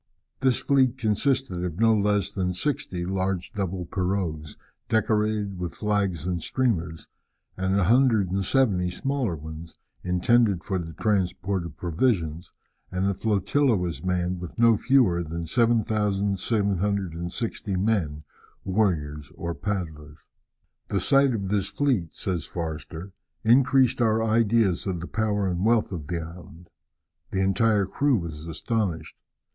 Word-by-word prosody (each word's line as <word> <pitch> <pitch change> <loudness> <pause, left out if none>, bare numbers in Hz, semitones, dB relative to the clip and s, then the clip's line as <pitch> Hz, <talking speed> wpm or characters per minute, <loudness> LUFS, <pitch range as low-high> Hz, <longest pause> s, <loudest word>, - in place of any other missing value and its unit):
This 130 -2 +3
fleet 130 -2 +2
consisted 120 -3 0
of 85 -2 -4
no 115 0 +5
less 105 -1 +1
than 90 -3 -1
sixty 90 -6 -2
large 95 0 -2
double 95 -3 -3
pirogues, 90 -4 -2 0.3
decorated 105 -3 0
with 90 -1 -4
flags 100 -7 -1
and 90 -2 -2
streamers, 85 -11 -1 0.5
and 95 0 0
170 100 -2 +3
smaller 130 -1 -2
ones, 80 +2 -9 0.3
intended 95 +1 +2
for 95 -2 -2
the 80 -1 -6
transport 95 -1 -1
of 75 -2 -14
provisions, 85 -3 -1 0.4
and 90 +1 -1
the 100 - +1
flotilla 110 +6 +1
was 90 -3 -3
manned 90 0 -1
with 90 -1 -8
no 115 -1 +6
fewer 110 -8 +3
than 85 +1 -5
7760 100 -3 0
men, 90 -7 0 0.4
warriors 80 -8 -1
or 85 0 -4
paddlers. 80 -7 -5 0.7
"The - - 0
sight 135 -2 +3
of 100 -3 -3
this 100 -1 +1
fleet," 125 - 0
says 90 -4 -2
Forster, 80 +2 -6 0.3
"increased 130 +1 +4
our 110 -1 +3
ideas 110 -4 +2
of 90 -3 -2
the 85 - -5
power 105 -1 0
and 90 0 -1
wealth 115 -1 +2
of 80 -6 -5
this 85 -2 -2
island. 85 0 -12 0.6
The 95 - -1
entire 100 +1 +2
crew 140 +8 +1
was 80 -3 -6
astonished. 90 +1 -2
95 Hz, 130 wpm, -25 LUFS, 85-110 Hz, 0.7 s, no